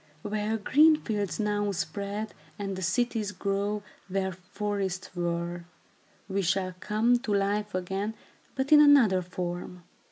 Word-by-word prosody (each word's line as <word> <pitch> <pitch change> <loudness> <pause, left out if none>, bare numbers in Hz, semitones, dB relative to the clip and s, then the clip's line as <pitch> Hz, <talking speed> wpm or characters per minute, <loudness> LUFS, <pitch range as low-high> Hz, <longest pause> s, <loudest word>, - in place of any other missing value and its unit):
Where 210 +1 -1
green 300 +9 +5
fields 205 - -3
now 205 -1 0
spread, 200 +3 -3 0.2
and 195 -1 -3
the 190 - -5
cities 210 +3 0
grow 205 +1 -1 0.2
where 190 0 -1
forests 190 0 -4
were, 170 0 -2 0.6
we 200 0 0
shall 185 +1 0
come 225 +5 +2
to 240 -4 -4
life 205 0 0
again, 195 +4 -2 0.4
but 265 +2 -2
in 300 -1 +9
another 255 -11 +6
form. 180 0 -5
200 Hz, 130 wpm, -28 LUFS, 185-215 Hz, 0.6 s, in